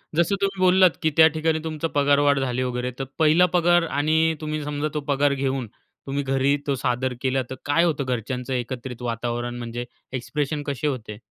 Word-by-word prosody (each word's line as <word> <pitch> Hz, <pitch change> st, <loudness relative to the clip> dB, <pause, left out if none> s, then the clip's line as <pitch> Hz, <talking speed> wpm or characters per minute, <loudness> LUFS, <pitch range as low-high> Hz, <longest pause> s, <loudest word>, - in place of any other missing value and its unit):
जसं 170 Hz, +4 st, +2 dB
तुम्ही 195 Hz, -1 st, -1 dB
बोललात 185 Hz, 0 st, +6 dB
की 160 Hz, -, +2 dB
त्या 160 Hz, 0 st, +9 dB
ठिकाणी 160 Hz, 0 st, +1 dB
तुमचा 160 Hz, 0 st, -3 dB
पगारवाढ 145 Hz, 0 st, +3 dB
झाली 130 Hz, -1 st, -1 dB
वगैरे, 125 Hz, 0 st, -2 dB
तर -, -, -1 dB, 0.2 s
पहिला 160 Hz, +3 st, +5 dB
पगार 175 Hz, 0 st, +4 dB
आणि 160 Hz, +2 st, +2 dB
तुम्ही 155 Hz, -1 st, -3 dB
समजा 145 Hz, +1 st, -2 dB
तो 150 Hz, -, -1 dB
पगार 140 Hz, 0 st, +2 dB
घेऊन 135 Hz, -3 st, -2 dB, 0.4 s
तुम्ही 140 Hz, +1 st, -2 dB
घरी 135 Hz, +1 st, +2 dB
तो 140 Hz, -, +1 dB
सादर 125 Hz, 0 st, -1 dB
केला, 130 Hz, 0 st, +1 dB
तर 130 Hz, -, -5 dB
काय 145 Hz, +4 st, +3 dB
होतं 150 Hz, -5 st, 0 dB
घरच्यांचं 125 Hz, +1 st, -3 dB
एकत्रित 125 Hz, 0 st, -4 dB
वातावरण? 120 Hz, +1 st, -3 dB
म्हणजे 120 Hz, 0 st, -5 dB, 0.3 s
एक्सप्रेशन 145 Hz, +4 st, -2 dB
कसे 140 Hz, +1 st, -2 dB
होते? 110 Hz, -6 st, -4 dB
140 Hz, 180 wpm, -24 LUFS, 125-155 Hz, 0.4 s, त्या